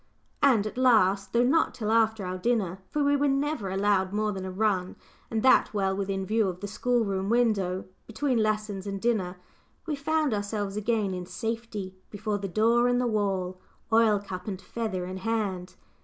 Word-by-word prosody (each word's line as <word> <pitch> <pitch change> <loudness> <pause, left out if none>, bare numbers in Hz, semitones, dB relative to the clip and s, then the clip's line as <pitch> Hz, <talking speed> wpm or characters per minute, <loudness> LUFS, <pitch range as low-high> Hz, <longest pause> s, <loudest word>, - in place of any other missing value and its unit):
And 240 -7 +4
at 215 +4 -4
last 205 -6 +3
though 235 +1 +3
not 280 +6 +2
till 215 -2 -2
after 220 -3 +2
our 185 0 -4
dinner, 195 -5 0
for 300 - 0
we 285 0 +3
were 285 +1 +2
never 275 -6 0
allowed 190 -1 +1
more 210 +1 0
than 190 -2 -5
"a 185 - -4
run," 190 -2 0 0.3
and 220 -1 -1
that 260 -4 +4
well 195 -1 +1
within 195 -1 -2
view 220 0 +2
of 180 -1 -6
the 205 - -5
schoolroom 205 -3 0
window, 210 -6 +1 0.2
between 250 +2 0
lessons 210 -2 -1
and 195 0 -3
dinner 195 -6 0 0.5
we 310 - -2
found 300 -1 0
ourselves 205 -1 -2
again 210 -2 0
in 180 -1 -5
safety 225 -4 -4 0.2
before 205 0 -3
the 195 - -3
door 230 +5 +3
in 245 0 +2
the 250 - +1
wall 195 -5 -1 0.3
oil 225 -2 +5
cup 190 -2 -7
and 190 -3 -4
feather 190 -1 -4
in 185 +1 -5
hand. 195 -4 -2
210 Hz, 185 wpm, -27 LUFS, 190-230 Hz, 0.5 s, oil